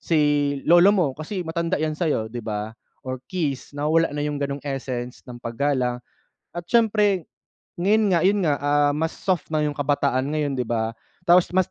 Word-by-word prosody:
si 165 -2 +1 0.5
lolo 175 +3 +6
mo 175 -5 +3
kasi 175 +5 -5
matanda 170 +2 -1
'yan 155 0 -1
sa'yo." 150 -9 -1
'Di 120 - -4
ba, 105 0 -4 0.3
or 130 -1 -4
kiss. 145 -5 -3
Nawawala 155 +1 +1
na 145 - -1
'yong 145 -1 -3
gano'ng 140 0 -3
essence 130 -3 -4
ng 120 - -8
paggalang 125 0 -1 0.6
at 175 - -4
siyempre, 210 -4 +2 0.5
ngayon 205 +3 +3
nga, 170 -2 +3
'yon 205 +1 +3
nga, 150 -4 +2
ah, 145 0 +2
mas 160 +3 -1
soft 180 -4 -2
na 155 - +2
'yong 150 -1 -1
kabataan 140 -2 +1
ngayon, 145 -3 -1
'di 125 - -1
ba. 110 -1 -1 0.3
Tapos, 175 +1 +5
mas 185 -1 +2
150 Hz, 180 wpm, -23 LUFS, 130-175 Hz, 0.6 s, lolo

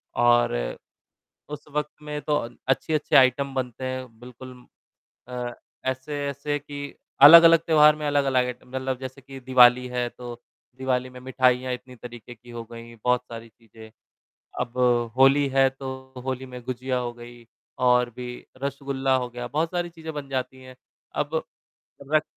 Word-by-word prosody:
और 120 0 +4 1.0
उस 150 -1 -7
वक़्त 150 0 -1
में 150 0 -5
तो 150 - 0
अ, 115 - -2 0.2
अच्छी-अच्छी 150 +3 +1
आइटम 135 +1 +4
बनते 130 -1 -4
हैं 130 0 -4
बिल्कुल 125 +1 -11 0.8
अ, 125 -1 -4 0.3
ऐसे-ऐसे 140 +2 -3
कि 145 0 -8 0.3
अलग-अलग 165 +3 +10
त्योहार 150 -1 +6
में 150 -1 -4
अलग-अलग 135 -3 +2
आइटम 125 0 -8
मतलब 130 0 -3
जैसे 130 +1 -8
कि 135 0 -11
दिवाली 125 -1 +5
है, 125 -1 -2
तो 120 0 -9 0.4
दिवाली 130 -1 -1
में 125 0 -12
मिठाइयाँ 130 0 +1
इतनी 125 0 -11
तरीके 120 0 -11
की 120 +1 -17
हो 120 -1 -7
गईं, 115 0 -10
बहुत 125 0 +3
सारी 115 0 -8
चीज़ें। 110 0 -16 0.7
अब 125 0 -4 0.4
होली 135 +2 +5
है 135 0 +4
तो 130 -1 -8
होली 130 0 -3
में 125 -1 -9
गुजिया 130 +1 -2
हो 120 -1 -3
गई 120 0 -13 0.3
और 125 -1 +3
भी 125 0 -6 0.3
रसगुल्ला 135 -1 -1
हो 125 -1 -2
गया, 120 0 -6
बहुत 155 +5 0
सारी 175 -1 -2
चीज़ें 160 -1 -8
बन 145 -2 -6
जाती 130 -1 -4
हैं। 130 0 -13 0.4
अब - - -1 0.7
रक 155 0 +4
130 Hz, 155 wpm, -25 LUFS, 125-140 Hz, 1.0 s, अलग-अलग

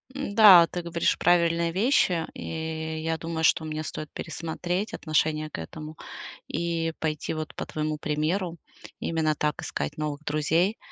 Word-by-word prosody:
М, 275 -7 -4
да, 195 -6 +10
ты 175 - -4
говоришь 170 -1 0
правильные 170 -1 +3
вещи, 185 - +2
и 160 0 -4
я 165 0 0
думаю, 165 0 -4
что 160 - +4
мне 155 0 -4
стоит 155 0 -6
пересмотреть 175 +5 -3
отношение 155 -1 0
к - - -6
этому 155 - -8 0.5
и 165 -1 -1
пойти 155 -2 -2
вот 155 -1 -5
по - - -4
твоему 155 0 -2
примеру, 165 +4 -1 0.4
именно 160 -2 0
так 150 +1 -1
искать 145 - -4
новых 150 -1 -3
друзей. 160 +7 +1
160 Hz, 150 wpm, -26 LUFS, 155-170 Hz, 0.5 s, да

